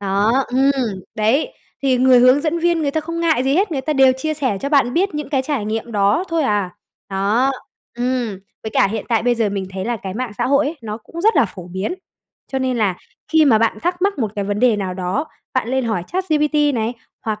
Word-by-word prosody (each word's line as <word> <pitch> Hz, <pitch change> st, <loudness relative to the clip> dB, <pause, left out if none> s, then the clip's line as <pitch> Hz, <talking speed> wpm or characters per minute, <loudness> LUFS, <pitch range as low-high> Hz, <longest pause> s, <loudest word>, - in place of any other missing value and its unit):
đó, 200 Hz, +3 st, +1 dB, 0.2 s
ừm, 255 Hz, -6 st, +1 dB
đấy. 240 Hz, -, +1 dB, 0.3 s
Thì 260 Hz, -2 st, +3 dB
người 255 Hz, -1 st, +6 dB
hướng 255 Hz, +3 st, +6 dB
dẫn 325 Hz, +2 st, -1 dB
viên 340 Hz, -1 st, +1 dB
người 285 Hz, -, +1 dB
ta 315 Hz, -, -1 dB
không 335 Hz, +2 st, -5 dB
ngại 320 Hz, -6 st, +2 dB
gì 270 Hz, +2 st, +2 dB
hết, 385 Hz, 0 st, +1 dB
người 270 Hz, -, -1 dB
ta 305 Hz, +3 st, -1 dB
đều 265 Hz, -2 st, +5 dB
chia 310 Hz, +3 st, -2 dB
sẻ 260 Hz, -9 st, -1 dB
cho 280 Hz, -, -2 dB
bạn 275 Hz, -4 st, +3 dB
biết 380 Hz, 0 st, +1 dB
những 300 Hz, 0 st, -4 dB
cái 270 Hz, -3 st, 0 dB
trải 270 Hz, -6 st, -2 dB
nghiệm 225 Hz, +2 st, -3 dB
đó 205 Hz, -, +2 dB
thôi 330 Hz, -2 st, 0 dB
à, 205 Hz, -6 st, 0 dB, 0.4 s
đó, 210 Hz, +8 st, +1 dB, 0.4 s
ừm. 240 Hz, -4 st, -2 dB, 0.2 s
Với 220 Hz, -, -5 dB
cả -, -, +3 dB
hiện 215 Hz, +1 st, -4 dB
tại 225 Hz, -2 st, +2 dB
bây 245 Hz, 0 st, +2 dB
giờ 225 Hz, -3 st, +1 dB
mình 195 Hz, -1 st, -3 dB
thấy 190 Hz, 0 st, -5 dB
là 240 Hz, 0 st, -1 dB
cái 190 Hz, -2 st, -7 dB
mạng 245 Hz, -1 st, -3 dB
xã 240 Hz, -, +1 dB
hội 280 Hz, +2 st, +3 dB
ấy, 315 Hz, +4 st, -3 dB
nó 215 Hz, -1 st, -4 dB
cũng 330 Hz, +9 st, -9 dB
rất 440 Hz, +4 st, +3 dB
là 280 Hz, -, +5 dB
phổ 180 Hz, -2 st, -9 dB
biến. 190 Hz, -, -3 dB, 0.6 s
Cho 265 Hz, -, 0 dB
nên 260 Hz, -1 st, -1 dB
là 200 Hz, -5 st, +1 dB, 0.3 s
khi 320 Hz, -1 st, +4 dB
mà 230 Hz, -6 st, +5 dB
bạn 225 Hz, -1 st, +1 dB
thắc 355 Hz, +1 st, -1 dB
mắc 400 Hz, -3 st, +1 dB
một 215 Hz, -4 st, -1 dB
cái 200 Hz, -, -1 dB
vấn 205 Hz, +1 st, -2 dB
đề 245 Hz, -4 st, +4 dB
nào 190 Hz, -3 st, -3 dB
đó, 185 Hz, -, -2 dB, 0.3 s
bạn 255 Hz, -3 st, 0 dB
lên 260 Hz, -1 st, 0 dB
hỏi 220 Hz, -6 st, -1 dB
ChatGPT 300 Hz, -5 st, +1 dB
này, 225 Hz, +1 st, -1 dB, 0.3 s
hoặc 215 Hz, -1 st, -3 dB
255 Hz, 245 wpm, -19 LUFS, 215-300 Hz, 0.6 s, người